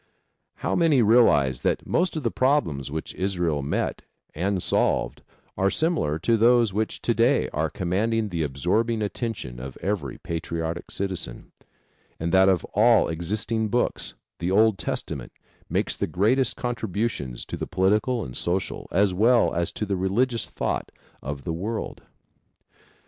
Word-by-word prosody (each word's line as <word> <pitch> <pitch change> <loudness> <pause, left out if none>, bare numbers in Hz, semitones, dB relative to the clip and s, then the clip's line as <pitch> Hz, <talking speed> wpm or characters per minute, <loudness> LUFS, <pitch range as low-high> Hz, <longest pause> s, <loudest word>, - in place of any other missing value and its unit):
How - - -2
many 155 -8 +4
realize 90 - +4
that - - 0
most 180 0 0
of 155 - -4
the 115 - 0
problems 100 - +1
which 80 +2 -5
Israel 90 -6 -1
met 70 - -2 0.3
and 95 +3 -1
solved - - +1 0.3
are 95 +1 +2
similar 155 - 0
to 115 +8 +2
those 115 -2 +4
which 110 +2 -2
to - - +2
day - - +2
are - - 0
commanding 110 +5 0
the 85 -3 -2
absorbing 100 - 0
attention 105 - -4
of 65 +1 -8
every 90 -9 -3
patriotic 85 0 -4
citizen, 95 -11 -4 0.7
and 85 +1 -2
that 95 +1 +6
of 95 -2 +1
all 115 +2 +5
existing 105 +7 -1
books, 120 +3 -1 0.2
the 85 - -1
Old 110 +1 +4
Testament - - -4 0.4
makes - - 0
the - - -2
greatest 115 - +2
contributions 110 - -3
to - - -5
the - - -4
political 105 +6 +1
and 60 - -8
social, 90 +2 -2
as 95 0 +3
well 115 +5 +4
as 85 0 -1
to 105 - -3
the 100 -1 -1
religious 115 +6 0
thought - - -3 0.3
of 70 0 -5
the 85 - -3
world? 105 +7 -4
100 Hz, 150 wpm, -25 LUFS, 85-115 Hz, 0.7 s, that